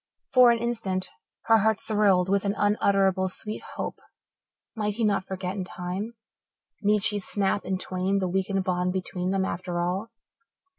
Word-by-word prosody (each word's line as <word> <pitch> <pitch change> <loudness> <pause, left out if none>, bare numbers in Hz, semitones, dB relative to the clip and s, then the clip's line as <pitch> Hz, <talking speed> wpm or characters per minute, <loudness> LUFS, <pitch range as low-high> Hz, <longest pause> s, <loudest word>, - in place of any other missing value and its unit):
For 250 -2 +8
an 235 - +4
instant 225 -6 -2 0.3
her 225 0 +5
heart 220 +1 +2
thrilled 200 -4 +2
with 195 0 +2
an 200 0 0
unutterably 195 -2 +2
sweet 210 +3 -5
hope. - - -4 0.8
Might 210 -2 -1
he 230 - -1
not 205 -3 +2
forget 185 0 -4
in 195 - -2
time? 185 +5 -5 0.7
Need 210 -1 +2
she 205 -1 +3
snap 200 0 -1
in 190 0 -1
twain 185 +1 -1
the 190 -1 0
weakened 190 +1 0
bond 180 0 0
between 185 -1 -2
them 190 0 +1
after 175 -1 -3
all? 185 +6 -1
195 Hz, 160 wpm, -26 LUFS, 185-210 Hz, 0.8 s, For